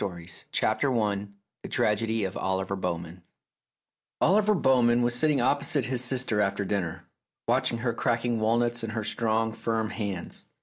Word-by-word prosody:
263 85 -4 -6
CRANK 110 - +1
STORIES 105 -7 +1 0.3
THE - - -8
TRAGEDY 110 +1 +1
OF 95 -1 -3
OLIVER 95 +1 -1
BOWMAN 85 -1 -4 1.0
Oliver 210 +4 +4
Bowman 120 -6 +3
was 120 0 +1
sitting 150 +3 +2
opposite 140 +1 +1
his 125 +1 0
sister 125 -3 +1
aftei 100 -1 0
dinner, 90 -5 -2 0.4
watching 115 - +2
her 120 0 -1
cracking 120 -1 0
walnuts 120 +2 +1
in 115 - -3
her 110 0 -3
strong, 110 +1 0
firm 110 -1 -2
hands. 100 -5 -5
115 Hz, 145 wpm, -27 LUFS, 100-120 Hz, 1.0 s, Oliver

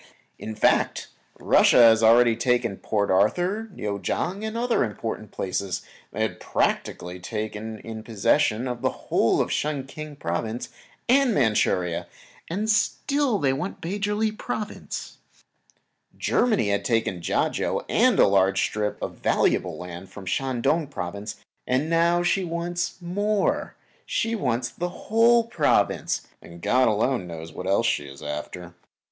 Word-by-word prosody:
In 110 - -6
fact 105 - +1 0.3
Russia - - +5
had 115 -2 +7
already 115 +1 +6
taken 120 -3 0
Port 100 -2 -1
Arthur, 180 - +1
Newchang 135 - -3
and 220 +1 -3
other 240 0 +2
important 110 -1 -4
places, 95 -1 -3 0.3
and - - -1
had - - -3
practically 90 +1 -1
taken 110 +3 -5
in 110 +1 -8
possession 110 +2 +1
the 125 -2 -1
whole - - +1
of - - -2
Shen 145 -3 -1
King 155 +2 -8
Province 110 +3 -3 0.4
and 260 -2 +4
Manchuria, 95 -8 +1 0.4
and 200 +6 -2
still 265 +3 +1
they 135 -5 +1
want 165 +9 -4
the 190 +5 -4
Pechili 210 +2 0
Province. 215 -2 -5 1.0
Germany 215 - +2
had 100 0 0
taken 115 -7 0
Kiachau - - 0
and - - +3
a - - +7
large 95 -1 +3
strip 105 -1 -1
of - - -5
valuable - - +1
land 90 +1 -8
from 100 +1 -10
the 95 - -4
Shan 130 -3 -1
Tung 160 -2 +2
Province, 100 -5 -5 0.3
and 135 +6 0
now 170 +1 +3
she 190 +2 +1
wants 175 0 -3
more; 205 +4 0 0.3
she 230 0 0
wants 125 - 0
that 170 +10 -4
whole 230 +6 +3
Province, 230 +1 +1 0.2
and 85 0 -12
God 125 +8 +3
alone 110 -1 +1
knows 80 -1 -8
what 90 - -6
else 95 - +2
she 75 - +1
is 70 0 -11
after. 85 +4 -6
120 Hz, 140 wpm, -25 LUFS, -, 1.0 s, had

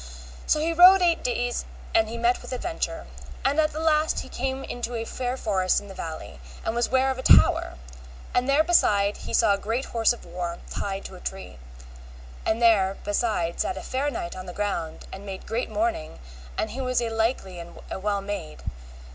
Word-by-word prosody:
So 305 - +3
he 330 +2 +1
rode 365 +2 +8
eight 340 -1 +2
days 245 0 -1 0.3
or 225 - +7
he 220 +1 -5
met 235 +1 +2
with - - -9
adventure. 325 +7 -3 0.4
And 280 +3 +2
at 310 0 +3
the 310 - -5
last 315 -1 +2
he 260 - -10
came 265 +1 -3
into 245 -1 -4
a 225 0 -3
fair 250 +2 -3
forest 190 -6 +1
in 205 -1 -11
a - - -8
valley, 160 - -7 0.3
and 225 - 0
was 240 0 0
ware 265 +1 +3
of 260 - -4
a - - -2
tower, - - +5 0.6
and 250 +2 +1
there 285 +3 +5
beside 205 -12 +3
he - - -7
saw 220 -3 +5
a 200 - -1
great 230 +6 -2
horse 230 -1 +2
of 240 - -6
war, 170 0 -4
tied 195 -1 -3
to - - -8
a - - -11
tree, 190 - -7 0.9
and 220 - +2
there 195 -4 +4
beside 205 -5 0
sat 185 - -1
a - - -6
fair 270 +3 -1
knight 175 -11 -5
on 185 0 -8
the 180 - -6
ground 185 -6 -3
and 195 - -8
made 195 -2 -7
great 230 +3 -2
mourning, 325 - -2 0.4
and - - -1
he 265 - -4
was 255 -1 +1
a 235 -1 -2
likely 225 -5 -1
man, 170 0 -7
and - - -14
a - - -3
well 200 0 0
made. 195 - -6
230 Hz, 210 wpm, -26 LUFS, 195-265 Hz, 0.9 s, rode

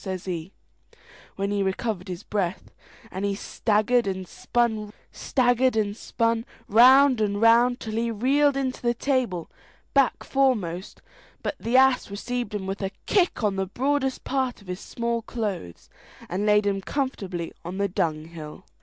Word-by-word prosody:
says 190 -2 -4
he, 175 -1 -4 0.8
when 200 +1 -2
he 205 -1 0
recovered 190 0 -2
his 180 +1 -6
breath; 195 -3 -3 0.4
and 190 +2 -4
he 200 -1 0
staggered 215 +3 +1
and 190 -1 -3
spun 220 -2 -1 1.8
round 255 +3 +6
and 205 -1 0
round 235 +2 +5
till 220 - -6
he 230 +1 0
reeled 275 +6 +2
into 260 -2 -2
the 240 0 +1
stable, 250 - 0 0.5
back 275 -3 +3
foremost, 210 -10 0 0.4
but - - -1
the 235 +3 +2
ass 265 -3 +4
received 240 +3 -4
him 195 -2 -3
with 195 +1 -4
a 195 - -1 0.2
kick 360 - +2
on 200 -2 +1
the 190 0 -1
broadest 265 +5 -1
part 260 -2 -1
of 200 - -18
his 180 0 -4
small 235 +1 -2
clothes, 205 - -5 0.4
and 195 +4 -2
laid 210 0 +4
him 195 -1 0
comfortably 195 - -3
on 180 +3 -6
the 200 0 +1
dunghill. 165 -2 -4
210 Hz, 145 wpm, -25 LUFS, 190-245 Hz, 1.8 s, round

